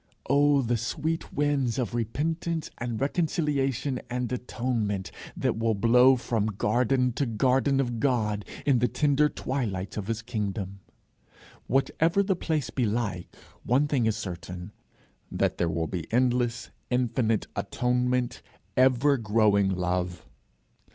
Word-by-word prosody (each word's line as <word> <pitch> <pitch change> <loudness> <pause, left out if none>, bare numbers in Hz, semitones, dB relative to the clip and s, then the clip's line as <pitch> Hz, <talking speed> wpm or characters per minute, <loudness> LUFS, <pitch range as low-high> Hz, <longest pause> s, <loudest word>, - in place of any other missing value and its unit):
Oh, 145 0 +4
the 120 0 +1
sweet 155 +8 -3
winds 140 -4 0
of 125 -2 -2
repentance 160 +8 -2
and 120 -2 -3
reconciliation 140 -4 0
and 125 -1 -2
atonement, 115 -6 -2 0.3
that - - 0
will 115 -1 +1
blow 125 +5 +6
from 115 -3 -1
garden 125 +5 +1
to 135 +3 -1
garden 130 +4 +2
of 120 -4 -1
God, 110 -6 +1 0.2
in 135 -4 +4
the 125 - +3
tender 150 +3 +2
twilights 105 -12 -3
of 105 -2 -4
his 115 -1 -2
kingdom! 100 -4 -4 0.9
Whatever 165 +8 +2
the 195 -1 +1
place 160 -4 -2
be 125 -4 0
like, 105 -5 -2 0.4
one 135 +5 +2
thing 130 -6 +1
is 110 - 0
certain, 90 -1 -6 0.6
that - - 0
there 85 - +1
will 80 0 -1
be 85 -1 -5
endless, 120 0 +1 0.2
infinite 120 -3 +1
atonement, 125 0 0 0.3
ever 130 +2 +4
growing 105 -3 +3
love. 90 -1 -2
120 Hz, 130 wpm, -27 LUFS, 105-135 Hz, 0.9 s, blow